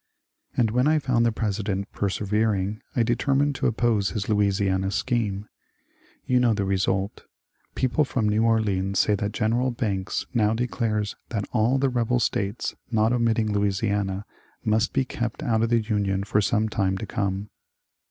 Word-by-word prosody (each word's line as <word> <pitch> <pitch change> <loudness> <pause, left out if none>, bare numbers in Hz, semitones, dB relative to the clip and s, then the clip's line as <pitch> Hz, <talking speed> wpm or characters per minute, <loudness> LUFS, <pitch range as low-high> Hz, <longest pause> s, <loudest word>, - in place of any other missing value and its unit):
And 115 -3 +3
when 125 +4 +2
I 155 +1 +4
found 125 -5 +2
the - - +2
President 100 -2 -2
persevering, 105 +1 -1
I 120 - +3
determined 135 +4 +1
to - - +1
oppose 115 -3 +1
his 105 -3 -3
Louisiana 100 -2 +1
scheme. 105 -1 -1 0.8
You 125 -1 +3
know 120 -3 +3
the 100 -1 -1
result 95 +1 -1 0.5
Peo 130 - +1
ple 150 +5 +2
from 115 -4 0
New 105 +1 +2
Orleans 100 -4 +1
say 105 - +3
that 105 0 -1
Gen. 115 +5 +1
Banks 100 -5 -2
now 110 -2 +2
declares 110 -3 -1
^^ - - -41
that 105 -4 -2
all 120 +3 +2
the 135 0 +2
rebel 125 0 +1
States, 105 -2 -1 0.2
not 110 0 +2
omitting 115 -3 +1
Louisiana, 100 -1 0 0.4
must 110 +1 +2
be 130 - +1
kept 120 +3 -4
out 115 -6 +1
of 115 - +1
the 115 -1 +3
Union 100 -3 0
for 105 +1 +1
some 110 +2 +1
time 95 -3 0
to 110 - -5
come." 100 0 -3
110 Hz, 165 wpm, -25 LUFS, 100-120 Hz, 0.8 s, I